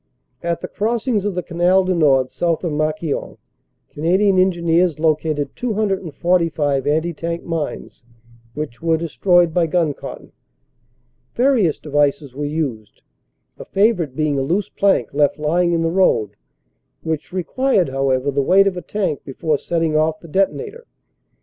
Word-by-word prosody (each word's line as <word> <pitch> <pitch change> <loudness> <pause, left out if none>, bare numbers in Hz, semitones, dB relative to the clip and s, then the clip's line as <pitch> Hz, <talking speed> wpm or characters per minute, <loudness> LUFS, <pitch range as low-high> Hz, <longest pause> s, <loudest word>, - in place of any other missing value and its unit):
At 170 0 -2
the - - -4
crossings 225 -1 -1
of 205 -3 -2
the 180 - -2
Canal 180 +2 +2
du 185 0 0
Nord 135 -6 +3
south 170 0 -1
of 170 - -1
Marquion 155 0 -2 0.5
Canadian 185 +5 +2
Engineers 175 -2 +2
located 155 -2 0
245 175 - 0
anti 160 +3 +1
tank 170 +2 -4
mines, 165 -6 -5 0.5
which 150 -6 -6
were 165 -1 +2
destroyed 175 +1 +2
by 170 -1 +2
gun 160 -2 +1
cotton. - - -10 1.0
Various 240 - +2
devices 145 -2 0
were 145 +2 -4
used, 140 -9 -4 0.6
a - - -8
favorite 195 - +1
being 150 -2 0
a - - 0
loose 180 +9 -1
plank 200 -1 +1
left 145 0 +2
lying 170 +3 +1
in 165 -1 +1
the 165 - 0
road 165 - +2 0.7
which 160 -1 -3
required 190 - 0
however 135 0 0
the 140 +1 +1
weight 190 +8 +5
of 195 -2 0
a 180 - -5
tank 195 -8 -3
before 150 +2 -2
setting 165 -2 -1
off 155 +1 +1
the 170 - -13
detonator. 420 - -2
165 Hz, 145 wpm, -19 LUFS, 150-185 Hz, 1.0 s, weight